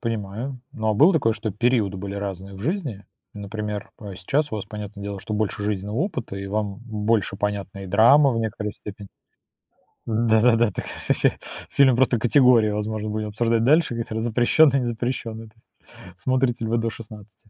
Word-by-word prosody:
Понимаю, 115 +3 -4
но 110 -6 -1
а - - +1
было 155 - +6
такое, 115 -9 +2
что 110 0 -4
периоды 105 -2 +1
были 100 +1 -6
разные 100 -1 -5
в - - -10
жизни, 140 - -3 0.3
например, 105 0 -5
э, 100 -3 -8
сейчас 140 - -1
у - - -1
вас, 100 - -5
понятное 105 -1 -8
дело, 100 -1 -5
что 105 - -5
больше 105 0 -2
жизненного 105 +1 -2
опыта 135 - -3
и 100 0 -5
вам 105 0 -2
б - - -15
больше 105 -2 0
понятны 100 -1 -3
и - - -7
драма 120 +9 +6
в 115 - -1
некоторой 105 -2 -3
степени. 100 -1 -10 1.0
Да-да-да, 115 0 +3
так - - -5
это - - -6
ж - - -6
ваще - - +1 0.3
фильм 130 -3 +4
просто 125 0 +3
категории, 120 -2 +5
возможно, 105 +1 -3
будем 105 0 -3
обсуждать 115 +1 +1
дальше, 150 +2 +3
они 115 - -2
там 110 0 -5
запрещенные, 120 +5 +4
не 125 - -2
запрещенные, 115 -1 -4
то - - -28
есть 115 - -32 0.5
смотрите 130 0 0
ли 110 - -3
вы 115 - +2
до 115 0 0
16? 110 -1 -12
110 Hz, 190 wpm, -23 LUFS, 105-120 Hz, 1.0 s, было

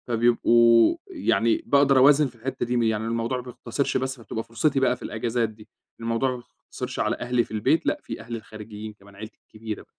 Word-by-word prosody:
فبيبقوا، 115 - +4
يعني 200 - +1
باقدَر 140 -1 +4
أوازِن 145 +3 +6
في 125 - -14
الحِتّة 130 +3 -4
دي، 120 +1 -1
م 120 - +2
يعني 110 -1 0
الموضوع 115 +2 -1
ما 125 - -6
بيقتصرش 125 +2 -3
بس، 130 0 -2
فبتبقى 115 0 -5
فرصتي 125 +5 0
بقى 130 -1 +2
في - - -26
الأجازات 115 0 -1
دي، 105 0 -16 0.3
الموضوع 115 +3 0
ما 125 - -4 0.3
بيقتصرش - - -6
على - - +1
أهلي 120 0 +1
في - - -16
البيت، 130 +9 +1
لأ - - +1
في - - -7
أهلي 115 +1 -6
الخارجيّين 110 0 -9
كمان، 100 -1 -19
عيلتي 110 +2 -10
الكبيرة. 110 -1 -8
115 Hz, 200 wpm, -25 LUFS, 110-130 Hz, 0.3 s, أوازِن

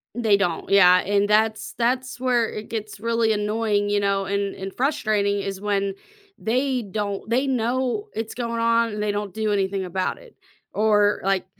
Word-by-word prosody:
They 220 -4 +3
don't, 175 -5 -2
yeah, 180 -2 +7
and 205 +2 +1
that's 220 +1 +1
that's 250 +2 -1
where 245 -3 +1
it 210 0 -7
gets 215 -2 -5
really 230 -1 +1
annoying, 210 -1 0
you 205 0 +2
know, 200 -1 0
and 200 0 -2
and 190 0 -7
frustrating 215 -7 +1
is 195 0 -5
when 200 -1 0 0.5
they 255 +2 0
don't 205 0 -4
they 255 +4 +2
know 255 - -1
it's 225 0 -4
going 235 -1 -3
on 230 0 +2
and 210 0 -3
they 210 - 0
don't 205 -2 -4
do 220 -1 -1
anything 195 -1 0
about 185 +1 -2
it, - - -17 0.4
or, 210 -1 +3
like, 195 -1 +1
210 Hz, 175 wpm, -23 LUFS, 200-230 Hz, 0.5 s, yeah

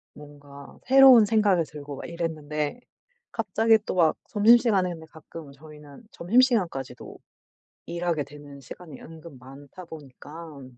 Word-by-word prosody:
뭔가 145 -1 -15
새로운 260 -4 +7
생각이 205 -5 +1
들고 145 -1 -10
막 - - -9
이랬는데 155 0 -5 0.5
갑자기 225 0 +1
또 - - -4
막 165 -3 +2
점심시간에 215 -3 +3
근데 160 -2 -10
가끔 160 -1 -13
저희는 150 - -15
점심시간까지도 180 - -1 0.7
일하게 170 -3 -3
되는 145 -1 -14
시간이 150 +3 -12
은근 160 -3 -13
많다 140 +7 -14
보니깐 145 -2 -13
160 Hz, 300 characters per minute, -24 LUFS, 145-185 Hz, 0.7 s, 새로운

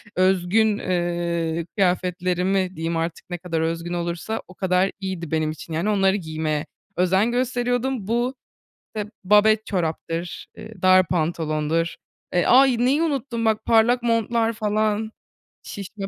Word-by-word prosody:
özgün, 190 +4 +3
eee, 170 -2 -1
kıyafetlerimi 180 0 0
diyeyim 165 +1 -2
artık, 165 +1 -4
ne 175 - -3
kadar 165 -2 -3
özgün 165 +1 -2
olursa 175 +6 -3
o 185 - -13
kadar 185 0 +1
iyiydi 185 -5 -5
benim 155 -1 0
için, 160 +1 -9
yani, 170 +6 0
onları 195 -2 +3
giymeye 155 -4 -2 0.3
özen 190 +6 +2
gösteriyordum. 245 -2 -1
Bu, 240 +3 0 0.6
eee, 210 - -2 0.2
babet 210 +2 +4
çoraptır, 170 -1 -3
eee, 215 +1 -11
dar 185 -1 +5
pantolondur, 160 -1 -1 0.4
eee, 175 - +2
ay, 260 -1 +6
neyi 265 +6 +2
unuttum 265 -7 -2
bak 220 -1 +1
parlak 235 +2 +4
montlar, 230 0 +1
falan, 215 0 0 0.5
şişme 200 0 -7
190 Hz, 130 wpm, -23 LUFS, 170-220 Hz, 0.6 s, ay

